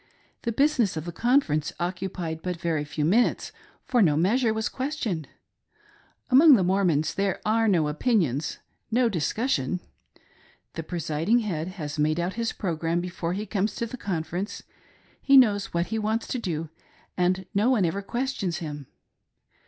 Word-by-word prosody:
The 235 - -2
business 245 - +2
of 155 - -4
the 175 - -4
Conference 225 - +1
occupied 175 -2 -3
but 180 -1 -4
very 165 -3 -1
few 150 0 -2
minutes, 220 +9 +2 0.3
for 245 -3 +2
no 155 -7 +4
measure 220 +8 +2
was 220 0 -1
questioned. 255 - -3 1.0
Among 285 +3 +8
the 195 - +2
Mormons 175 -5 +1
there, 195 -1 -1
are 225 +1 +2
no 170 -7 +3
opinions, 155 - 0 0.3
no 240 +1 +3
discussion. 180 - -1 0.9
The 165 - -4
presiding 165 - 0
head 170 -7 -3
has 150 -2 -5
made 155 +2 +2
out 175 +2 -1
his 230 0 -2
programme 165 -2 -1
before 175 -1 -3
he 205 +3 -3
comes 205 0 -1
to 235 - -2
the 230 - -7
conference; 185 -2 -4 0.6
he 275 0 +6
knows 215 -4 +4
what 170 0 0
he 220 - 0
wants 220 +2 -1
to 255 - -2
do, 165 -7 -3 0.5
and 185 +1 +1
no 210 +5 +3
one 225 -8 +3
ever 190 +4 -1
questions 235 -6 -2
him. 145 -4 -6
185 Hz, 155 wpm, -26 LUFS, 165-225 Hz, 1.0 s, Among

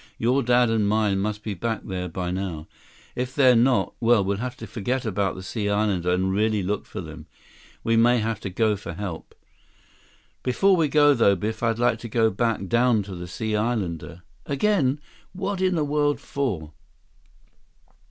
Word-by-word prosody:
Your 125 +4 +2
dad 120 -1 +3
and 110 -2 +1
mine 105 -2 +1
must 105 +1 -3
be 105 - -3
back 110 +5 -3
there 90 -2 -4
by 90 +1 -3
now. 90 -4 -4 0.5
If 125 +1 -3
they're 130 -3 +6
not, 125 +2 +2
well, 115 -3 +4
we'll 100 +1 -1
have 125 +3 -5
to - - -8
forget 125 +3 -3
about 100 -3 -1
the 95 - -8
Sea 105 +1 -3
Islander 100 -4 +1
and 95 +1 +1
really 105 0 +1
look 100 +2 -2
for - - -6
them. 80 -1 -10 0.6
We 115 - +2
may 120 +2 +5
have 110 -2 -2
to 100 - -5
go 105 +3 +1
for 95 -3 -7
help." 90 -2 -7 1.1
"Before 190 +10 +3
we 165 -3 +2
go, 145 0 +5
though, 115 -6 +4
Biff, 110 +4 -4
I'd 115 -1 +1
like 120 -1 +1
to 115 - -8
go 110 0 +2
back 115 -1 -1
down 120 +1 +2
to 95 -1 -8
the 90 0 -7
Sea 110 +5 -3
Islander—" 95 -7 -2 0.2
"Again? 145 -3 +1 0.3
What 195 0 -3
in 185 -1 +2
the 155 -3 +1
world 145 0 +1
for?" 100 - -3
110 Hz, 180 wpm, -24 LUFS, 95-125 Hz, 1.1 s, they're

